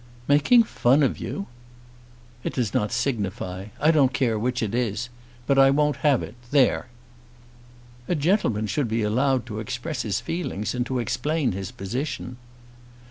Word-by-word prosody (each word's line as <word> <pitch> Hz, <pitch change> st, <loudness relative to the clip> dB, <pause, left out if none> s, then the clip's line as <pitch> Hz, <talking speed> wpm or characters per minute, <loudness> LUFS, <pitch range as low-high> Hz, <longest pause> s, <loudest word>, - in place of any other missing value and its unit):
"Making 150 Hz, -, +5 dB
fun 140 Hz, -, +2 dB
of 135 Hz, -, 0 dB
you!" 200 Hz, -, -4 dB, 1.0 s
"It -, -, -3 dB
does 120 Hz, -6 st, -1 dB
not 105 Hz, +2 st, 0 dB
signify. 100 Hz, -7 st, -2 dB
I 155 Hz, +2 st, +4 dB
don't 140 Hz, -5 st, +3 dB
care 115 Hz, -5 st, +1 dB
which 125 Hz, +2 st, -1 dB
it 105 Hz, -1 st, -2 dB
is. 120 Hz, -1 st, -1 dB, 0.4 s
But 135 Hz, +2 st, +3 dB
I 135 Hz, 0 st, +7 dB
won't 145 Hz, 0 st, +2 dB
have 140 Hz, -3 st, +2 dB
it. 105 Hz, -, -8 dB, 0.2 s
There!" 135 Hz, -3 st, +3 dB, 1.2 s
"A 175 Hz, -, +1 dB
gentleman 145 Hz, -, +1 dB
should 115 Hz, +6 st, -1 dB
be 110 Hz, 0 st, -1 dB
allowed 130 Hz, +4 st, +1 dB
to 110 Hz, -3 st, -6 dB
express 120 Hz, +8 st, -4 dB
his 100 Hz, -4 st, -1 dB
feelings 165 Hz, -, -3 dB
and 125 Hz, -1 st, -2 dB
to 130 Hz, -, -2 dB
explain 145 Hz, +5 st, 0 dB
his 95 Hz, 0 st, -5 dB
position." 125 Hz, +4 st, -4 dB
125 Hz, 155 wpm, -24 LUFS, 110-145 Hz, 1.2 s, I